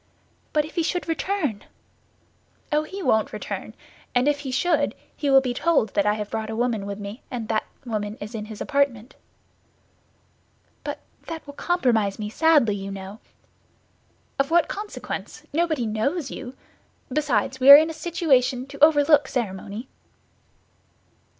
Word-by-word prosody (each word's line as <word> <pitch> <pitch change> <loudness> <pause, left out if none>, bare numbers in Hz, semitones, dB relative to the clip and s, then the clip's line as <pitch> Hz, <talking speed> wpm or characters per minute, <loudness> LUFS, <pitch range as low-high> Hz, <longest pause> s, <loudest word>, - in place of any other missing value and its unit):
"But 300 -1 +2
if 310 - -11
he 340 - 0
should 345 0 -2
return?" 325 - -1 1.1
"Oh, 300 0 +3
he 380 +5 -7
won't 220 -7 +2
return; - - -6 0.4
and 245 +3 +3
if 295 -1 +2
he 280 -2 -6
should, 295 +2 +1 0.2
he 290 - -1
will 270 0 +7
be 255 -2 -2
told 265 -6 +1
that 200 - +2
I 210 - +3
have 210 -1 -5
brought 220 -1 -3
a 220 - -3
woman 225 -4 -1
with 200 0 -4
me, 205 +3 -7
and 235 -4 -5
that 220 -1 0 0.2
woman 215 -3 -3
is 210 +3 -7
in 215 -2 -4
his 215 -1 -9
apartment." 275 -4 0 1.7
"But - - -5 0.3
that 325 -1 -6
will 285 - -9
compromise 240 - +1
me 210 -1 -5
sadly, 295 -7 +4
you 195 0 -6
know." 195 +2 -8 1.2
"Of 275 - +2
what 335 -1 +4
consequence? 415 +1 -6
Nobody 315 -6 +1
knows 260 +9 -1
you. 265 0 -7 0.6
Besides, 275 -2 0
we 265 +1 +5
are 280 - +14
in 315 +2 +2
a - - -7
situation 285 -7 +1
to 280 +1 -3
overlook 295 -1 +5
ceremony." 210 0 -4
265 Hz, 155 wpm, -24 LUFS, 220-305 Hz, 1.7 s, are